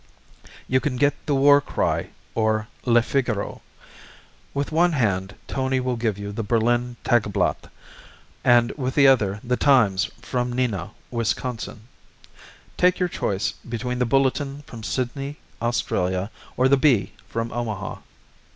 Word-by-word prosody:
You 130 - +3
can 130 0 -2
get 145 +3 +3
the 145 - +2
War 140 +1 +6
Cry, - - -1 0.2
or 110 -1 +1 0.2
Le 120 -2 +4
Figaro. 120 -6 -1 0.9
With 140 +2 -2
one 170 +2 +3
hand, 100 -7 0
Tony 130 -1 0
will 125 -1 -1
give 115 -4 -1
you 100 0 -5
the 105 - -3
Berlin 120 +2 +1
Tageblatt, 115 -5 +1 0.7
and 120 -1 +5
with 130 -2 -3
the 140 - +6
other 105 -7 +3
the 125 +1 0
Times 110 -9 +4
from 125 0 -2
Neenah, 110 -8 -1 0.2
Wisconsin. 115 -1 -2 1.0
Take 180 0 +4
your 180 -1 0
choice 100 - -1 0.2
between 125 +1 -3
the 125 - +2
Bulletin 135 +2 +1
from 115 -5 -10
Sydney, 135 +5 -3 0.2
Australia, 95 -4 0 0.3
or 130 - +4
the 140 +1 +5
Bee 120 -9 +3
from 115 0 -3
Omaha. 110 -5 -4
120 Hz, 135 wpm, -24 LUFS, 110-135 Hz, 1.0 s, War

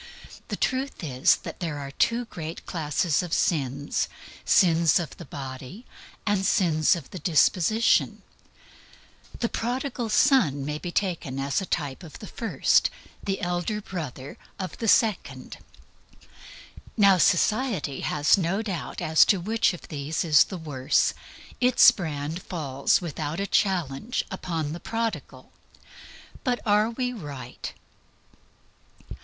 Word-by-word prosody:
The - - -3
truth 260 -4 -2
is, 130 -4 +3
there 160 -5 -5
are 140 -1 -6
two 235 +11 +1
great 165 -6 -7
classes 160 0 0
of 175 -3 -5
sins 140 -3 0 0.3
sins 170 -6 +4
of 170 - -5
the 170 - -9
Body 135 - -8 0.4
and 205 -2 +1
sins 165 -5 +3
of 170 - -9
the 185 - -6
Disposition. 180 +7 +2 1.2
The 235 - +2
Prodigal 245 0 -3
Son 210 - +3
may 150 +1 -3
be 175 - -5
taken 170 -9 -2
as 140 +6 -1
a 190 - -5
type 145 -3 -3
of 165 -5 -11
the - - -10
first, 230 +2 +1 0.3
the 195 -1 -3
Elder 175 +4 -1
Brother 150 -9 -7 0.2
of 185 -2 -5
the 225 - -2
second. 215 -2 +1 1.4
Now, 200 -3 +6
society 195 - +1
has 150 +6 +2
no 190 +5 0
doubt 185 -8 -4
whatever 165 -3 -3
as 160 - +8
to 195 - +3
which 220 +5 +1
of 175 - -10
these 150 +3 -3
is 150 -4 +6
the 190 - -7
worse. 145 -4 +1 0.5
Its 250 -1 +7
brand 160 -4 -4
falls, 140 -6 0
without 155 -1 -4
a 200 - -1
challenge, 190 - 0
upon 165 -5 -3
the 170 - -6
Prodigal. 205 - -4 0.9
But 250 -3 0
are 210 +1 +3
we 250 +1 -2
right? 140 - -7
175 Hz, 130 wpm, -26 LUFS, 150-210 Hz, 1.4 s, as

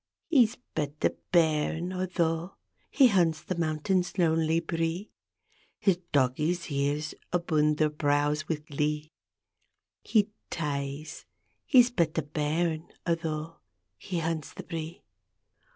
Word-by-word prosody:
He's 245 -9 +4 0.2
but 150 -2 -2
a - - +4 0.2
bairn, 165 +1 +2
atho' 175 -1 -1 0.3
He 270 -4 +6
hunts 170 -6 +2
the - - -2
mountain's 170 +4 0
lonely 165 -2 +3
bree, 165 +4 -2 0.7
His 195 -5 +2
doggies' 150 +6 +1
ears 145 +2 -1 0.2
abune 155 -3 +2
their 155 0 +2
brows 150 +1 +1
wi' 165 - +2
glee 150 0 -3 0.9
He 210 -1 +2 0.2
ties; 145 -1 -4 0.4
he's 250 -3 +6
but 170 -8 0
a 160 - +1
bairn, 155 +2 -1 0.2
atho' 165 -1 -2 0.4
He 175 - -5
hunts 160 -2 -2
the - - -7
bree. 165 0 -6
160 Hz, 115 wpm, -28 LUFS, 150-175 Hz, 0.9 s, He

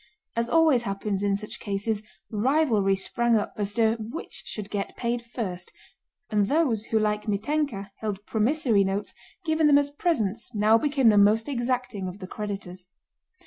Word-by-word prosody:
As 230 0 0
always 320 -6 +4
happens 200 -2 -2
in 200 -1 +1
such 210 +1 -8
cases 205 +1 -2 0.3
rivalry 220 -4 +2
sprang 235 +4 +1
up 205 - -2
as 205 0 -1
to 225 -1 +3
which 225 +8 -5
should 210 -1 -6
get 200 -1 -3
paid 235 0 -1
first, 200 -7 -5 0.6
and 205 -2 +2
those 265 -8 +1
who 220 - 0
like 210 -1 0
Mítenka 210 -1 -1
held 210 -2 -4
promissory 225 -2 +2
notes 195 +2 -2 0.3
given 315 -1 +3
them 285 -1 +6
as 285 0 +1
presents 235 - -1
now 215 +2 +4
became 280 -4 +3
the 210 -1 +5
most 215 +2 +4
exacting 245 -6 -2
of 180 +1 -7
the 195 - -8
creditors. 190 -3 -6
220 Hz, 160 wpm, -26 LUFS, 200-250 Hz, 0.6 s, them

